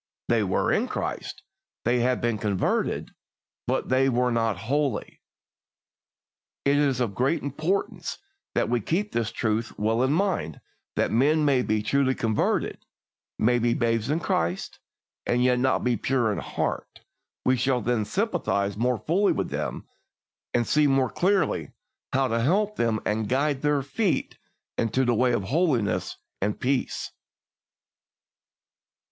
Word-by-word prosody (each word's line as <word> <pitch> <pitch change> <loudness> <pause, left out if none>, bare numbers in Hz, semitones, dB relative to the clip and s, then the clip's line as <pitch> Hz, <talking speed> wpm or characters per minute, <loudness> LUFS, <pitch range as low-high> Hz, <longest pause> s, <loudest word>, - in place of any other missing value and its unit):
They 115 -2 +3
were 95 -3 +1
in - - +1
Christ, - - -4 0.4
they 120 +1 +3
had 125 +1 +1
been 115 -3 0
converted, 100 -2 0 0.6
but - - -1
they 130 +1 +3
were 125 0 +1
not 115 -4 +1
holy. 140 -2 -1 1.4
It 140 +1 +4
is 140 -3 +2
of 115 -5 0
great 135 +10 0
importance 155 +8 -2 0.4
that - - +2
we 120 0 +1
keep 195 - -1
this 115 -2 -1
truth 110 0 -2
well 110 +3 +1
in 130 +1 +2
mind 165 - 0 0.4
that - - +1
men 150 +6 +3
may 135 -3 +3
be 110 -3 0
truly 130 +3 +2
converted, 110 -2 0 0.5
may 120 +2 +3
be 120 0 +2
babes 115 0 0
in 155 +3 +1
Christ, 85 - -1 0.5
and 125 +1 +2
yet 125 -1 +3
not 130 +1 +1
be 125 -1 +2
pure 120 -1 +1
in - - -3
heart; - - -4 0.4
we 130 - +4
shall 130 +1 +1
then 120 0 0
sympathise 105 - -1
more 125 +2 +1
fully 190 - +2
with - - -3
them, - - -4 0.6
and 120 -1 +1
see 150 +3 +3
the - - +2
more 130 -4 +2
clearly 195 - +1 0.4
how 135 0 +2
to 115 -1 0
help 205 - +2
them 115 - +1
and 105 0 -1
guide 140 +1 +1
their 145 -2 +1
feet 160 +2 -1 0.4
into 125 +4 +1
the 120 - +3
way 125 +2 +3
of 120 -5 0
holiness 130 - 0 0.2
and 105 +2 -1
peace. 130 0 -1
125 Hz, 150 wpm, -26 LUFS, 115-140 Hz, 1.4 s, It